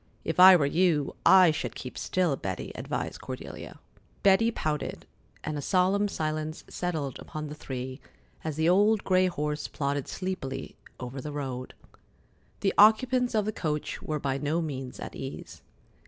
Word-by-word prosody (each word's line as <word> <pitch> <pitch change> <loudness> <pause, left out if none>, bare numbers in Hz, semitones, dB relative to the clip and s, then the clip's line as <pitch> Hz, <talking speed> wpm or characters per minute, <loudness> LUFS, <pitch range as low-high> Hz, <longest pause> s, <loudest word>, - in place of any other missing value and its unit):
"If 165 - -2
I 185 +1 +11
were 155 -5 +3
you, 155 -1 +1
I 185 -3 +8
should 125 -7 -4
keep 125 - -7
still, 180 -6 0
Betty," 95 -7 -5
advised - - -4
Cordelia. - - -8 0.5
Betty 200 +4 +5
pouted, 155 -9 -3 0.4
and 150 -1 -3
a - - -4
solemn 190 +5 +2
silence 155 -3 -3
settled 155 -7 -3
upon 155 -2 -6
the - - -6
three 130 -2 -6 0.4
as 155 -2 -3
the 160 +1 +1
old 205 +4 +4
gray 185 0 +3
horse 150 -3 -2
plodded 140 -1 -2
sleepily 180 -9 -5 0.2
over 125 +2 -6
the 150 - -6
road. 130 -3 -5 0.9
The 195 - +1
occupants 245 +3 +5
of 210 -2 +2
the 215 - -1
coach 150 -7 -3
were 155 -1 -3
by 135 -1 -1
no 150 +3 0
means 135 -6 -5
at - - -7
ease. 135 - -8
155 Hz, 155 wpm, -28 LUFS, 140-185 Hz, 0.9 s, I